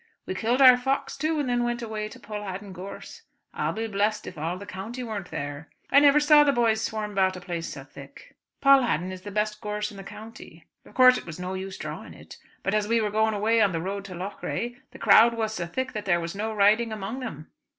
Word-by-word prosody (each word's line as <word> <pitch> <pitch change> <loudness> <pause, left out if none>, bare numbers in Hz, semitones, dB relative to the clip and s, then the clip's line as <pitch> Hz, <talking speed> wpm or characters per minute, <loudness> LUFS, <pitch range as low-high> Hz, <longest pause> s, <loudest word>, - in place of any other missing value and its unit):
We - - -3
killed 235 +7 +2
our 255 -1 +9
fox 265 +2 -1
too 310 +2 -1
and 285 - -1
then 245 -1 +1
went 240 0 -2
away 215 -1 -4
to - - -13
Pulhaddin 205 -2 -6
gorse. 185 +2 -9 0.3
I'll - - -1
be 225 +1 -3
blest 210 0 -1
if - - -8
all 165 +3 -3
the 200 - -9
county 220 +7 -6
weren't 210 -6 -5
there. 145 +2 -6 0.2
I 280 - +8
never 290 0 +6
saw 295 0 +6
the 285 - +3
boys 230 -4 +2
swarm 215 -2 -3
about 190 -2 +1
a - - -7
place 170 -2 -5
so 135 - -8
thick. 140 0 -14 0.3
Pulhaddin 245 - +4
is 185 -1 -8
the 205 - -8
best 210 +1 -2
gorse 210 -1 -3
in 200 - -12
the 195 - -8
county. 210 -6 -12 0.2
Of - - -18
course 255 0 +7
it - - -14
was 165 +1 -7
no 180 +1 -4
use 190 0 -5
drawing - - -7
it; - - -13 0.3
but 195 - -1
as 210 -1 +1
we 230 +1 +2
were 210 -2 -1
going 220 +1 +2
away 220 +2 +2
on 200 -3 +3
the 165 - -1
road 195 +3 -4
to 185 -2 -8
Loughrea 200 +5 -4 0.2
the - - -13
crowd 235 +1 +6
was 220 -1 -2
so 175 -4 -4
thick 260 +8 -3
that 210 -2 -5
there 175 -3 +2
was 170 0 -4
no 215 +3 -3
riding 215 +2 +3
among 215 +4 -5
them. 160 - -7
210 Hz, 240 wpm, -26 LUFS, 185-235 Hz, 0.3 s, our